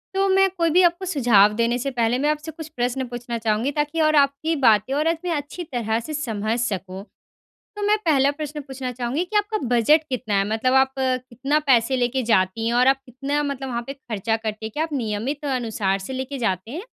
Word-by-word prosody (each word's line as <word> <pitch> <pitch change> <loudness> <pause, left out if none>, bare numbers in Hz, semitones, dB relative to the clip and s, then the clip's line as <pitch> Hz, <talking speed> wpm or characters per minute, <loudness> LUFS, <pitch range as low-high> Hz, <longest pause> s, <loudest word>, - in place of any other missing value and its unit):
तो 390 0 +2
मैं 385 0 +4
कोई 335 -1 +2
भी - - +8
आपको 345 +3 -5
सुझाव 215 - +5
देने 235 +1 +1
से 275 - -2
पहले 230 +2 +2
मैं - - +3
आपसे 305 +1 -2
कुछ 320 -2 -7
प्रश्न 250 +2 0
पूछना 240 -1 -4
चाहूँगी 225 +6 +1
ताकि 295 +2 0
और 310 - +2
आपकी 280 +4 -2
बातें 215 +4 +4
और 310 - +1
इतनी 345 +2 -6
अच्छी 290 +5 -6
तरह 225 -2 -1
से 310 - -5
समझ 220 -4 -2
सकूँ। 190 -2 -5 0.7
तो 415 - -5
मैं 425 - +4
पहला 280 -2 +4
प्रश्न 300 0 -4
पूछना 260 -1 -4
चाहूँगी 275 +9 0
कि 430 - -1
आपका 420 +1 +1 0.2
बजट 300 +8 +4
कितना 220 -4 -3
है? 195 - -1
मतलब 225 +4 +1
आप 265 0 +4
अ, 260 -1 +1
कितना 270 +6 0
पैसे 250 +1 +4
लेके 250 +1 0
जाती 190 +3 +1
हैं? 235 - 0
और 255 - +4
आप 270 - -29
कितना 275 +4 -2
मतलब 270 0 -6
वहाँ 235 -1 -3
पे 275 - -4
खर्चा 225 -5 -3
करते 215 +1 -3
हैं? - - -6
क्या - - +2
आप 320 - -7
नियमित 230 +8 -3
अनुसार 210 -5 -1
से 265 - -5
लेके 275 +1 -6
जाते 190 +3 -4
हैं? 320 +8 -5
255 Hz, 220 wpm, -23 LUFS, 225-295 Hz, 0.7 s, भी